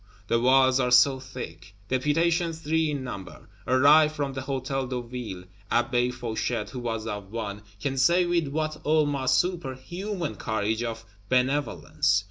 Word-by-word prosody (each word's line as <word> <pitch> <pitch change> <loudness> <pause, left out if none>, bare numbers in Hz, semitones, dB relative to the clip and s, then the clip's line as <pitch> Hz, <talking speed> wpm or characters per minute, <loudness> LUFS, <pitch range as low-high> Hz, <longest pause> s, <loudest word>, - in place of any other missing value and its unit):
The 115 - +3
walls 130 +1 +4
are 125 -1 +1
so 130 +2 +5
thick! 100 -8 -9
Deputations, 165 - +1
three 160 0 +1
in 145 -3 -3
number, 100 -7 -8 0.2
arrive 150 +4 +6
from 145 -3 -3
the 135 - -4
Hôtel 135 0 -3
de 125 -1 -2
Ville; 120 -6 -6 0.3
Abbé 120 +1 +2
Fauchet 120 -1 -3
(who 130 - -5
was 115 -2 -3
of 105 -3 -5
one) 105 -3 -4 0.2
can 135 +4 -2
say 170 +7 +4
with 170 -3 +1
what 155 +2 -3
almost 145 -4 +2
superhuman 175 +3 -3
courage 110 0 -1
of 115 -1 -4 0.2
benevolence. 125 - +1
130 Hz, 145 wpm, -26 LUFS, 120-150 Hz, 0.3 s, arrive